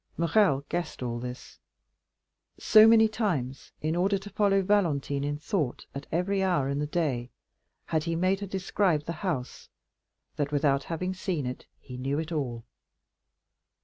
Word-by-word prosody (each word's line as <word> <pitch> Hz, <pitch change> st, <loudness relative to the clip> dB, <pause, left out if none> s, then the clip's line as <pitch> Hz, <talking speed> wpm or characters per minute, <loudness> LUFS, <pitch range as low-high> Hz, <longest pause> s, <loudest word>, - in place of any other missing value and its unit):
Morrel 170 Hz, -4 st, +3 dB
guessed 175 Hz, -6 st, -3 dB
all 120 Hz, -1 st, -3 dB
this. 125 Hz, 0 st, -8 dB, 1.0 s
So 215 Hz, 0 st, +7 dB
many 225 Hz, -1 st, +7 dB
times, 165 Hz, -, -2 dB
in 155 Hz, +2 st, 0 dB
order 195 Hz, +3 st, +2 dB
to 200 Hz, +1 st, -10 dB
follow 195 Hz, -2 st, +2 dB
Valentine 155 Hz, -8 st, +1 dB
in 145 Hz, 0 st, -2 dB
thought 150 Hz, -, -2 dB
at 140 Hz, +1 st, -7 dB
every 190 Hz, +4 st, 0 dB
hour 175 Hz, -8 st, +1 dB
in 140 Hz, +1 st, -1 dB
the 150 Hz, -, -1 dB
day, 140 Hz, -7 st, -1 dB, 0.6 s
had 160 Hz, -1 st, -1 dB
he 165 Hz, -1 st, -1 dB
made 185 Hz, +3 st, +1 dB
her 200 Hz, -, -5 dB
describe 190 Hz, -4 st, 0 dB
the 170 Hz, -, -4 dB
whole 185 Hz, +2 st, -1 dB
house, 125 Hz, -, -14 dB, 0.7 s
that 145 Hz, -1 st, -1 dB
without 140 Hz, -2 st, +1 dB
having 180 Hz, +3 st, -3 dB
seen 185 Hz, -6 st, -3 dB
it 125 Hz, +1 st, -6 dB
he 125 Hz, -2 st, -10 dB
knew 135 Hz, +3 st, -2 dB
it 160 Hz, +2 st, -3 dB
all. 125 Hz, -7 st, -3 dB
160 Hz, 160 wpm, -28 LUFS, 140-190 Hz, 1.0 s, So